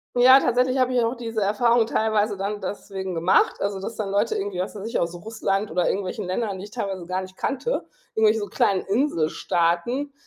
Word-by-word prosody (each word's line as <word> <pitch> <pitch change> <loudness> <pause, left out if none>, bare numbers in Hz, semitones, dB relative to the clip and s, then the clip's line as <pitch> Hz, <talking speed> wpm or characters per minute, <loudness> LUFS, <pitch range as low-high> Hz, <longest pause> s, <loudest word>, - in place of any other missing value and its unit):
Ja, 260 +2 +8
tatsächlich 255 +2 +1
habe 255 0 +2
ich 245 -2 +3
auch 230 +3 0
diese 230 -2 -4
Erfahrung 225 +3 +3
teilweise 215 -2 +1
dann 205 +1 -3
deswegen 190 -1 -5
gemacht, 170 +3 +3
also, 200 -1 -2
dass 220 +4 -6
dann 200 -3 -3
Leute 205 +3 +1
irgendwie, 195 -2 -3
was 185 - -3
weiß 205 0 -6
ich, - - -1
aus 170 +1 -1
Russland 205 0 -2
oder 180 +1 +1
irgendwelchen 195 +1 -3
Ländern, 190 +1 -2
die 200 - -7
ich 210 - -13
teilweise 195 -7 -4
gar 185 +1 -1
nicht 185 0 -10
kannte, 280 - -2 0.3
irgendwelche 220 0 +3
so 205 - -3
kleinen 195 -1 +1
Inselstaaten, 200 - 0
205 Hz, 200 wpm, -24 LUFS, 190-230 Hz, 0.3 s, Ja